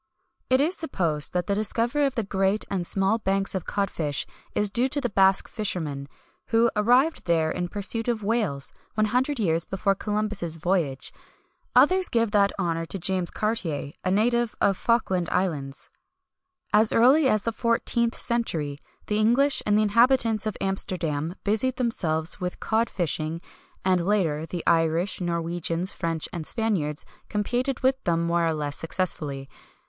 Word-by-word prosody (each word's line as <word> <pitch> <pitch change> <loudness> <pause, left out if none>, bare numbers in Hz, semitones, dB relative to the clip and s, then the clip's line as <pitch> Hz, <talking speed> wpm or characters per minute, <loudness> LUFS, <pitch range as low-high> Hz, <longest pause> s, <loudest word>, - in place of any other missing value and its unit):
[XXI - - -19
158] 280 - +3
It - - +2
is 360 - -1
supposed 165 - 0
that 180 -1 0
the 200 - 0
discovery 235 +7 +1
of 270 - -5
the 230 - 0
great 195 +1 0
and 180 -3 -1
small 195 +3 +1
banks 195 -1 0
of 190 -3 -3
cod 200 -1 -1
fish 145 -4 -2 0.3
is 205 -1 +1
due 245 +4 +1
to 290 - -1
the 245 -5 -2
Basque 195 -1 +3
fishermen, 155 - -3 0.4
who 230 +1 +3
arrived 250 +9 +2
there 160 -2 +2
in 175 0 -2
pursuit 205 +4 -4
of 230 -3 -1
whales, 200 -11 -1 0.2
one 215 0 +2
hundred 255 +6 0
years 165 -5 +1
before 195 +1 0
Columbus' 210 -4 0
voyage. 160 -6 -1 0.6
Others 360 +9 +5
give 230 -2 +1
that 200 -2 +3
honour 165 -3 -2
to 195 - -3
James 180 0 0
Cartier, 175 -10 -2
a 185 - 0
native 235 +4 +1
of 195 - +3
Falkland 190 -7 0
Islands. 150 -7 -2 0.8
"As 215 +1 +4
early 265 +5 +5
as 215 -3 +2
the 230 - -2
14th 235 0 0
century, 160 - -1 0.3
the 210 0 -1
English 250 +6 +3
and 210 0 +3
the 215 - +3
inhabitants 230 0 +3
of 215 - -3
Amsterdam 175 -4 -2
busied 220 +5 +1
themselves 180 -10 -1
with 180 0 -4
cod 225 +1 0
fishing; 165 -2 -2 0.5
and 185 -2 +2
later, 165 -6 0
the 175 0 -5
Irish, 165 +3 +1
Norwegians, 170 +1 -1
French, 165 -2 -3
and 165 -3 -4
Spaniards 180 -10 -1 0.2
competed 245 +5 -1
with 265 0 +1
them 170 -1 +1
more 170 0 +1
or 160 - 0
less 145 -1 -1
successfully. 155 -6 -2
195 Hz, 165 wpm, -25 LUFS, 170-230 Hz, 0.8 s, Others